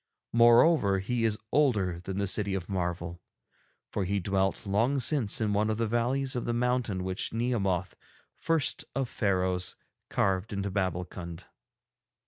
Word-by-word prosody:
Moreover, 120 - +5
he 115 +5 -1
is 110 -1 +1
older 105 - +2
than 95 +2 -5
the 100 - +1
City 100 0 +1
of 90 -2 -4
Marvel, 85 -2 -3 0.7
for 100 - -1
he 100 +2 0
dwelt 95 +3 0
long 115 +8 +1
since 125 -5 +1
in 105 -2 0
one 105 +1 +1
of 110 - 0
the 115 - +1
valleys 125 +4 0
of 120 - -2
the 120 - -1
mountain 120 -6 0
which 95 +3 -3
Nehemoth, 100 -6 0 0.4
first 165 -3 0
of 135 -2 0
Pharaohs, 95 -5 0 0.3
carved 95 +3 0
into 100 0 -2
Babbulkund. 90 -2 -3
100 Hz, 145 wpm, -29 LUFS, 95-120 Hz, 0.7 s, Moreover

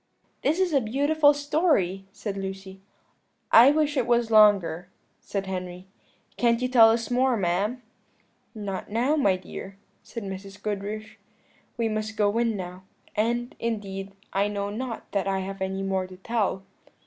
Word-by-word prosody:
"This 315 +5 +1
is 370 -4 +1
a 275 - +4
beautiful 285 +6 +3
story," 285 - +1
said 200 0 -5
Lucy. 195 0 -6 0.7
"I 235 +4 +9
wish 300 0 +1
it 255 -4 +1
was 235 -1 +2
longer," 200 -5 +4 0.3
said 195 -1 -4
Henry; 180 -1 -5 0.5
"can't 235 -1 +3
you 250 - 0
tell 235 -3 +7
us 230 +2 0
more, 250 0 +2
ma'am?" 200 +7 -1 0.7
"Not 200 -3 -5
now, 245 +8 +1
my 200 -11 +3
dear," 190 +1 -9 0.2
said 230 - -8
Mrs. 195 0 -7
Goodriche, 210 +1 -5 0.6
"we 230 -1 +1
must 215 0 -3
go 205 0 +2
in 230 -3 +1
now; 180 0 -7 0.3
and, 240 +3 0
indeed, 195 -4 -4 0.2
I 200 +1 +2
know 200 -1 -3
not 230 +1 -5
that 200 -1 -1
I 195 -1 0
have 195 +1 -6
any 190 0 -2
more 190 -1 -1
to 185 0 -12
tell." 200 -2 -1
210 Hz, 155 wpm, -26 LUFS, 195-240 Hz, 0.7 s, I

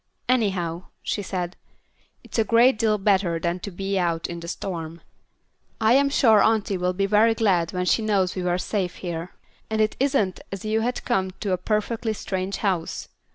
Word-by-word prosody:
"Anyhow," 190 -8 0 0.2
she 205 - -2
said, 180 -2 -4 0.7
"it's - - -4
a - - +5
great 230 +2 +4
deal 220 -2 +2
better 190 -4 +2
than 170 +2 -1
to 200 - -6
be 195 +1 -2
out 170 -2 0
in 170 0 -5
the 170 - -8
storm. 170 -2 -5 0.8
I 220 +1 +4
am 280 +1 +4
sure 225 -7 +5
auntie 215 -2 +2
will 180 0 0
be 195 +2 0
very 215 +3 +4
glad 185 -7 +2
when 180 0 -2
she 225 - +3
knows 200 -4 +1
we 185 - -2
were 180 0 +1
safe 185 -1 -2
here, 170 -1 -6 0.3
and 220 0 -1
it 215 0 +2
isn't 260 -9 +1
as 195 +1 -6
if 215 - -2
you 220 0 +2
had 245 +2 -2
come 190 -6 +1
to 200 -4 0
a - - +1
perfectly 220 +3 -1
strange 190 -1 -3
house. 180 -5 -1
195 Hz, 195 wpm, -24 LUFS, 180-220 Hz, 0.8 s, a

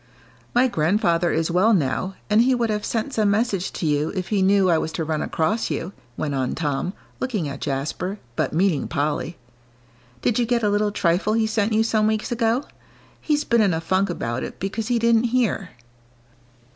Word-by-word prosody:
"My 250 +2 +5
grandfather 170 -2 +1
is 160 +2 0
well 200 +6 +4
now, 175 +4 -1
and 215 +1 +4
he 255 +2 +3
would 235 -2 0
have 210 0 -2
sent 230 +4 -2
some 215 -2 +2
message 200 -3 0
to - - -4
you 150 0 +1
if 185 -2 -3
he 205 -3 +1
knew 195 0 +4
I 165 -3 +3
was 160 - -3
to 165 - -2
run 155 -1 -2
across 165 +8 -1
you," 180 +4 -3 0.2
went 145 -2 -2
on 130 -2 -1
Tom, 150 +3 -2 0.3
looking 215 - -2
at 140 - -6
Jasper, 155 +8 -3 0.2
but - - 0
meaning 175 -2 +1
Polly; 150 +3 -2 0.9
"did 240 - +2
you 240 - +1
get 240 -1 +1
a 210 - +3
little 205 0 +1
trifle 185 +2 +1
he 225 0 +2
sent 220 0 0
you 220 +1 +3
some 220 -1 +2
weeks 215 +1 -1
ago? 235 +3 +1 0.6
He's 300 -1 +1
been 235 -1 +3
in 195 -5 +3
a - - -1
funk 185 +4 0
about 125 -7 -3
it - - -7
because 210 +3 -3
he 245 -1 +1
didn't 230 0 +3
hear." 235 -6 0
200 Hz, 195 wpm, -23 LUFS, 165-225 Hz, 0.9 s, My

